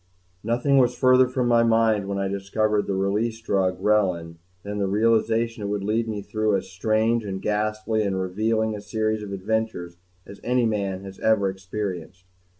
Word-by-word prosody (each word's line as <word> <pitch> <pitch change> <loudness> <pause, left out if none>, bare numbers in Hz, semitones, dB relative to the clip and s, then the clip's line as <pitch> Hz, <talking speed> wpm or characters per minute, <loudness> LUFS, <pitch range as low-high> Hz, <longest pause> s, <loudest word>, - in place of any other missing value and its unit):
COBLENTZ 110 - -7
I 115 - +3
Nothing 140 +3 +2
was 125 -1 +3
further 130 0 +5
from 125 -1 -1
my 120 -1 +4
mind, 115 -3 +2
when 100 0 -2
I 100 0 -1
discovered 105 +2 -1
the 100 - -1
"Release 105 +4 -1
Drug" 95 -4 0
Relin, 90 -6 +1 0.3
than 105 0 -4
the 100 - 0
realization 115 +2 +1
that 100 - -3
it - - -4
would 100 -1 -2
lead 110 +3 0
me 105 -2 -4
through 110 0 0
as 95 0 -7
strange 110 +4 +1
and 95 -2 -4
ghastly 110 +1 -1
and 95 -2 -1
revealing 110 +4 0
a 105 - -7
series 110 +1 -1
of 105 -1 -7
adventures 100 -3 -3 0.3
as 100 - -12
any 125 0 +2
man 100 -3 -2
has 95 -1 -10
ever 100 -3 +2
experienced. 95 -2 -6
105 Hz, 190 wpm, -24 LUFS, 95-115 Hz, 0.3 s, further